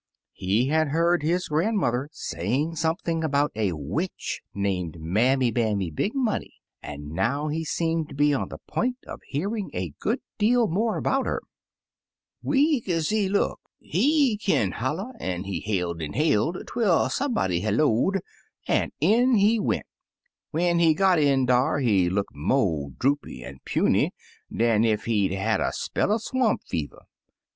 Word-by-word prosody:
He 105 Hz, +8 st, 0 dB
had 155 Hz, 0 st, +2 dB
heard 170 Hz, +3 st, +2 dB
his 175 Hz, +4 st, 0 dB
grandmother 150 Hz, -, 0 dB
saying 130 Hz, -, -2 dB
something 165 Hz, +1 st, -1 dB
about 145 Hz, -1 st, +1 dB
a 105 Hz, -5 st, 0 dB
witch 80 Hz, -, -4 dB
named 90 Hz, -5 st, -2 dB
Mammy 120 Hz, +10 st, +2 dB
Bammy 105 Hz, -7 st, 0 dB
Big 205 Hz, -, -1 dB
Money, 250 Hz, -5 st, -1 dB, 0.3 s
and 75 Hz, 0 st, -8 dB
now 140 Hz, -, 0 dB
he 160 Hz, +2 st, -2 dB
seemed 165 Hz, 0 st, -1 dB
to -, -, -9 dB
be 145 Hz, +1 st, +3 dB
on 135 Hz, -, -1 dB
the -, -, -7 dB
point 250 Hz, +2 st, -1 dB
of -, -, -8 dB
hearing 200 Hz, +8 st, -2 dB
a 90 Hz, -5 st, -3 dB
good -, -, 0 dB, 0.2 s
deal 235 Hz, +2 st, +3 dB
more 215 Hz, +5 st, 0 dB
about 270 Hz, 0 st, 0 dB
her. -, -, -1 dB, 1.0 s
66 -, -, -15 dB
Taily.Po -, -, -1 dB
"Weak 280 Hz, -6 st, +2 dB
ez 165 Hz, -3 st, 0 dB
he 210 Hz, -3 st, +1 dB
look, 200 Hz, -, 0 dB, 0.2 s
he 265 Hz, -, +2 dB
kin' 110 Hz, -, +1 dB
holla, 160 Hz, -, -3 dB
an* 90 Hz, 0 st, -3 dB
he 100 Hz, -1 st, -3 dB
hailed 90 Hz, -5 st, -2 dB
an* 75 Hz, -, -4 dB
hailed 155 Hz, -, +1 dB
twel 205 Hz, -9 st, +2 dB
somebody 220 Hz, -, 0 dB
hello'd, 120 Hz, -, +2 dB, 0.5 s
an* -, -, +1 dB
in 235 Hz, -, +4 dB
he 215 Hz, +2 st, +4 dB
went. -, -, -1 dB, 0.6 s
When 170 Hz, +2 st, +1 dB
he 165 Hz, -2 st, +4 dB
got 190 Hz, -2 st, +4 dB
in 140 Hz, -3 st, +3 dB
dar, 125 Hz, +2 st, +2 dB
he 100 Hz, -10 st, +2 dB
look 100 Hz, +2 st, -2 dB
mo* 80 Hz, -, 0 dB
droopy 140 Hz, +3 st, -1 dB
an* 65 Hz, +1 st, -10 dB
puny -, -, +2 dB, 0.4 s
dan 115 Hz, -2 st, +2 dB
ef 110 Hz, -2 st, +1 dB
he*d 100 Hz, -5 st, +1 dB
*a* -, -, -4 dB
had 110 Hz, +3 st, +1 dB
a -, -, 0 dB
spell -, -, -1 dB
er 215 Hz, -, +3 dB
swamp 240 Hz, 0 st, 0 dB
fever. 75 Hz, -3 st, -4 dB
145 Hz, 160 wpm, -25 LUFS, -, 1.0 s, in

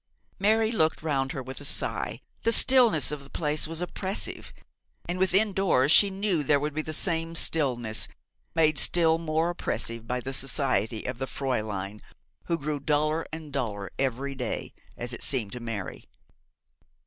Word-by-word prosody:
Mary 220 Hz, +2 st, +2 dB
looked 160 Hz, -8 st, +1 dB
round 135 Hz, -4 st, -1 dB
her 135 Hz, -, -5 dB
with 130 Hz, +2 st, -8 dB
a -, -, -9 dB
sigh. 140 Hz, -, -1 dB, 0.2 s
The 230 Hz, -, +1 dB
stillness 230 Hz, -, +6 dB
of 145 Hz, -2 st, -5 dB
the 135 Hz, -, -15 dB
place 150 Hz, 0 st, 0 dB
was 165 Hz, +1 st, -4 dB
oppressive, 190 Hz, +3 st, -3 dB, 0.6 s
and 175 Hz, +1 st, -3 dB
within 195 Hz, +3 st, +2 dB
doors 165 Hz, -8 st, +2 dB
she 200 Hz, +4 st, +7 dB
knew 195 Hz, -4 st, 0 dB
there 145 Hz, 0 st, +2 dB
would 150 Hz, +1 st, -3 dB
be 155 Hz, -, -1 dB
the 155 Hz, -, -6 dB
same 165 Hz, 0 st, +1 dB
stillness, 125 Hz, -10 st, +1 dB, 0.5 s
made 155 Hz, -3 st, +3 dB
still 165 Hz, -2 st, +5 dB
more 165 Hz, +1 st, 0 dB
oppressive 115 Hz, -8 st, -3 dB
by 125 Hz, +1 st, -1 dB
the 135 Hz, +2 st, -5 dB
society 130 Hz, -5 st, 0 dB
of 125 Hz, -1 st, -4 dB
the 135 Hz, -, -3 dB
Fräulein, 105 Hz, -8 st, -3 dB, 0.4 s
who 170 Hz, -, 0 dB
grew 150 Hz, -1 st, -3 dB
duller 155 Hz, +2 st, 0 dB
and 155 Hz, -2 st, -8 dB
duller 105 Hz, -7 st, -3 dB
every 135 Hz, +1 st, -1 dB
day, 130 Hz, -2 st, -4 dB, 0.2 s
as 120 Hz, +1 st, -4 dB
it -, -, -7 dB
seemed 120 Hz, -8 st, -1 dB
to 125 Hz, -, -6 dB
Mary. 115 Hz, -5 st, -6 dB
150 Hz, 165 wpm, -27 LUFS, 130-165 Hz, 0.6 s, she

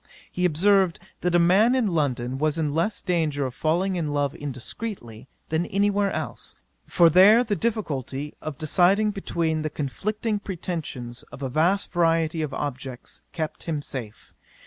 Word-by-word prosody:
He 180 Hz, -, -1 dB
observed, 185 Hz, +2 st, +3 dB, 0.2 s
that 175 Hz, 0 st, 0 dB
a -, -, +7 dB
man 195 Hz, +8 st, +4 dB
in 255 Hz, -3 st, +2 dB
London 135 Hz, -, -1 dB
was 155 Hz, +1 st, +1 dB
in 150 Hz, -3 st, -1 dB
less 170 Hz, +7 st, 0 dB
danger 155 Hz, -6 st, 0 dB
of 130 Hz, -, -4 dB
falling 175 Hz, +7 st, 0 dB
in 155 Hz, -4 st, -2 dB
love 145 Hz, -1 st, 0 dB
indiscreetly, 135 Hz, -, -7 dB, 0.2 s
than 160 Hz, +2 st, 0 dB
any 200 Hz, +1 st, +2 dB
where 200 Hz, 0 st, +1 dB
else; -, -, -5 dB, 0.3 s
for 170 Hz, -2 st, +5 dB
there 195 Hz, +8 st, +7 dB
the 215 Hz, -4 st, -1 dB
difficulty 150 Hz, -, -3 dB
of 155 Hz, -3 st, -5 dB
deciding 190 Hz, +7 st, +3 dB
between 165 Hz, -5 st, -1 dB
the 155 Hz, -, -2 dB
conflicting 210 Hz, -, -2 dB
pretensions 160 Hz, -11 st, -5 dB
of 140 Hz, -, -9 dB
a 135 Hz, -, -2 dB
vast 170 Hz, +9 st, +1 dB
variety 165 Hz, -1 st, +1 dB
of 155 Hz, -2 st, -2 dB
objects, 130 Hz, -3 st, -6 dB
kept 155 Hz, -1 st, -5 dB
him 155 Hz, -3 st, -2 dB
safe. 115 Hz, -7 st, -7 dB
165 Hz, 160 wpm, -25 LUFS, 145-195 Hz, 0.3 s, a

